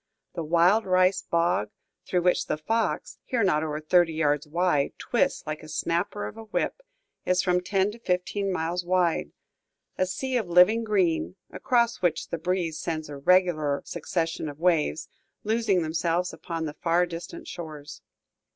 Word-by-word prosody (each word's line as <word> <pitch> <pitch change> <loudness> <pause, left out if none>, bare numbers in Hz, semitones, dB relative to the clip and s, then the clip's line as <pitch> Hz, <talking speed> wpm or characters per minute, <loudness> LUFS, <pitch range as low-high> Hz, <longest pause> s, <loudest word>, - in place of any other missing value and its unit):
The 170 - -4
wild 175 +7 +3
rice 185 0 +3
bog, 170 - 0 0.4
through 180 -2 +1
which 180 - +2
the - - -1
Fox, 225 +9 -2
here 240 -4 0
not 175 -6 +2
over 155 -1 -3
thirty 165 +1 +3
yards 150 -2 +1
wide, 165 -3 +1
twists 260 +3 0
like 155 0 -4
the 155 - -11
snapper 175 +6 -1
of - - -8
a 225 - -9
whip, 220 - -2 0.4
is 180 0 +2
from 180 -1 +2
ten 195 +2 +1
to 230 - -12
fifteen 195 0 -1
miles 175 0 -1
wide, 175 - +1 0.7
a 185 - +2
sea 255 +8 -2
of 215 -7 -2
living 180 +7 +5
green, 185 -5 +1 0.2
across 235 -2 +1
which 170 -3 0
the 170 - -3
breeze 170 -2 -1
sends 155 -3 -3
a 145 - -7
regular 155 -3 +2
succession 165 -2 -2
of 145 - -9
waves, 165 - +1 0.4
losing 215 -5 +1
themselves 170 +3 -1
upon 165 -2 -5
the 150 - -4
far 170 +3 +1
distant 170 0 -8
shores. 155 -4 -8
175 Hz, 160 wpm, -26 LUFS, 160-190 Hz, 0.7 s, living